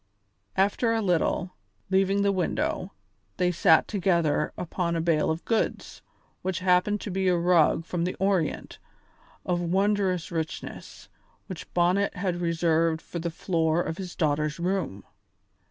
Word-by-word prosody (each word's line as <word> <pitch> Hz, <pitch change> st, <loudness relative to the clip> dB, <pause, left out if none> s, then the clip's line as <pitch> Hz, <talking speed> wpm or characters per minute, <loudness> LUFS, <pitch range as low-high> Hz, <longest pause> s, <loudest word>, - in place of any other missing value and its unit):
After 205 Hz, +4 st, +2 dB
a -, -, +1 dB
little, 180 Hz, 0 st, 0 dB, 0.4 s
leaving 195 Hz, +1 st, +2 dB
the 200 Hz, -, +3 dB
window, 185 Hz, -3 st, -1 dB, 0.5 s
they 180 Hz, 0 st, +2 dB
sat 165 Hz, -1 st, +4 dB
together 170 Hz, -7 st, +1 dB
upon 170 Hz, -1 st, -2 dB
a -, -, 0 dB
bale 165 Hz, -2 st, +1 dB
of 160 Hz, +1 st, -3 dB
goods, 225 Hz, -2 st, -2 dB, 0.4 s
which 185 Hz, -1 st, -2 dB
happened 185 Hz, +3 st, +2 dB
to 205 Hz, -, -5 dB
be 190 Hz, +1 st, 0 dB
a 180 Hz, -1 st, +3 dB
rug 170 Hz, -2 st, +3 dB
from 175 Hz, 0 st, -2 dB
the 180 Hz, -, -2 dB
Orient, 190 Hz, -5 st, -1 dB, 0.7 s
of 175 Hz, -1 st, 0 dB
wondrous 190 Hz, 0 st, 0 dB
richness, 160 Hz, -2 st, -6 dB, 0.4 s
which 185 Hz, -4 st, -9 dB
Bonnet 180 Hz, +4 st, +2 dB
had 180 Hz, -2 st, -2 dB
reserved 165 Hz, -1 st, +1 dB
for 170 Hz, -, -7 dB
the 170 Hz, +1 st, -2 dB
floor 165 Hz, -1 st, 0 dB
of 160 Hz, +3 st, -5 dB
his 185 Hz, -2 st, -6 dB
daughter's 150 Hz, -1 st, 0 dB
room. 175 Hz, -, -2 dB
175 Hz, 140 wpm, -26 LUFS, 165-190 Hz, 0.7 s, sat